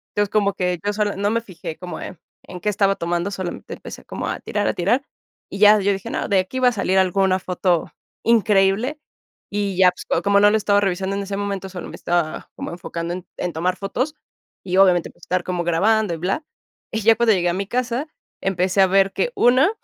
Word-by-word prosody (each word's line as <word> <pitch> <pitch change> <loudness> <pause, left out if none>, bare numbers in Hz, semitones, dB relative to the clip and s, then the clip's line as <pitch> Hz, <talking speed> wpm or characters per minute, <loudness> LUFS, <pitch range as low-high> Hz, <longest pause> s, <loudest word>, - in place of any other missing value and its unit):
Entonces, 205 0 +1
como 200 -2 +2
que 180 -2 -1
yo 205 - 0
sola 205 -1 -1
no 205 +1 +1
me 230 +2 0
fijé 175 -6 -8
como, 180 +1 -7
eh, 185 - -7 0.3
en 180 -1 -9
qué 210 - 0
estaba 195 -1 +2
tomando, 175 +2 -1
solamente 185 -3 -6
empecé - - -10
como - - -5
a - - -3
tirar, 205 -1 -2
a - - +1
tirar, 240 +10 +1 0.5
y 195 - -5
ya 210 0 +7
yo 200 0 +2
dije: 195 +4 -4
"No, - - -2
de 200 - +2
aquí 190 +8 -3
va 255 - +4
a - - -2
salir 190 -3 +1
alguna 190 0 +2
foto 180 -1 0 0.3
increíble", 220 +4 +2 0.5
y 200 -2 -2
ya, 185 -1 +6 0.2
pues, 170 - +1
como 200 0 +4
no 205 +1 +6
lo 220 - +3
estado 205 -1 +2
revisando 195 0 -1
en 200 - -2
ese 195 0 -4
momento, 200 -1 -3
solo 180 -1 -7
me - - -9
estaba 170 -2 -2
como - - -5
enfocando 170 0 -5
en 180 - -8
en 180 - -2
tomar 180 +4 0
fotos, 255 +10 -2 0.5
y 185 0 -1
obviamente, 180 -3 +4
pues - - -23
estar 185 -1 -1
como 180 -1 -2
grabando 200 +4 +2
y - - -4
bla. 195 - -2 0.5
Y 220 - -1
ya 225 +2 +5
cuando 230 -2 +3
llegué 175 -2 +1
a - - 0
mi 195 +2 -2
casa, 250 +3 -1 0.4
empecé 190 0 +1
a 190 - +6
ver 195 +1 +3
que - - 0
una, 255 - +4
195 Hz, 225 wpm, -21 LUFS, 180-210 Hz, 0.5 s, ya